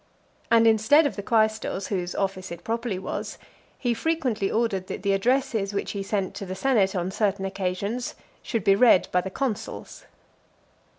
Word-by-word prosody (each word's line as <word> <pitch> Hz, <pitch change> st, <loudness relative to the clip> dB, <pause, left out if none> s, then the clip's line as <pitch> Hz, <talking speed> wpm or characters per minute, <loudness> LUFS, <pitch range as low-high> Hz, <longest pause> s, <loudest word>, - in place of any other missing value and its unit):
And 230 Hz, 0 st, +5 dB
instead 225 Hz, +8 st, +5 dB
of 285 Hz, -, -1 dB
the 200 Hz, -, -4 dB
quaestors, 215 Hz, -3 st, 0 dB
whose 180 Hz, -3 st, -2 dB
office 190 Hz, -2 st, -2 dB
it 170 Hz, 0 st, -8 dB
properly 230 Hz, -3 st, -2 dB
was, 190 Hz, -, -5 dB, 0.4 s
he 245 Hz, -2 st, 0 dB
frequently 250 Hz, -6 st, -1 dB
ordered 210 Hz, -5 st, 0 dB
that -, -, -6 dB
the 200 Hz, -1 st, +2 dB
addresses, 220 Hz, -2 st, 0 dB
which 200 Hz, -, -2 dB
he 200 Hz, -, -4 dB
sent 195 Hz, -1 st, -2 dB
to 200 Hz, -, -5 dB
the 185 Hz, -, -4 dB
senate 200 Hz, -3 st, +2 dB
on 180 Hz, +1 st, -1 dB
certain 195 Hz, -1 st, 0 dB
occasions, 195 Hz, +5 st, -3 dB, 0.3 s
should 230 Hz, -5 st, -2 dB
be 195 Hz, -, +5 dB
read 225 Hz, -3 st, +5 dB
by 180 Hz, -, +3 dB
the 190 Hz, -, -5 dB
consuls. 240 Hz, +2 st, -4 dB
205 Hz, 170 wpm, -25 LUFS, 190-230 Hz, 0.4 s, And